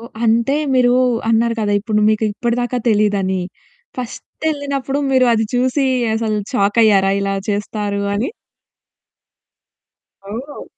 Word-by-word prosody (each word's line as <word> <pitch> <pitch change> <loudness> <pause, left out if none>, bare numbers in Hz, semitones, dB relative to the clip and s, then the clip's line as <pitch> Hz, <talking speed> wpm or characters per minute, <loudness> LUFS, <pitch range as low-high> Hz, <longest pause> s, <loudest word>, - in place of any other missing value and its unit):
ఓహ్! 230 - -11
అంటే 235 +5 +2 0.2
మీరు 245 -1 +4 0.4
అన్నారు 230 +1 +2
కదా! 205 -1 0
ఇప్పుడు 210 0 0
మీకు 215 0 0
ఇప్పటి 235 +2 -1
దాకా 245 +1 -2
తెలీదని. 200 -3 +1 0.5
ఫస్ట్ 250 +5 -8
ఎళ్ళినప్పుడు 280 -2 -3
మీరు 260 -1 +4
అది 225 0 +1
చూసి 260 +2 +1 0.3
అసలు 220 -1 -1 0.2
షాకయ్యారా? 200 -3 +3
ఇలా 195 0 -1
చేస్తారు 205 0 -2
అని. 225 - -1 2.0
ఓహ్! 260 +7 -7
225 Hz, 115 wpm, -18 LUFS, 205-250 Hz, 2.0 s, మీరు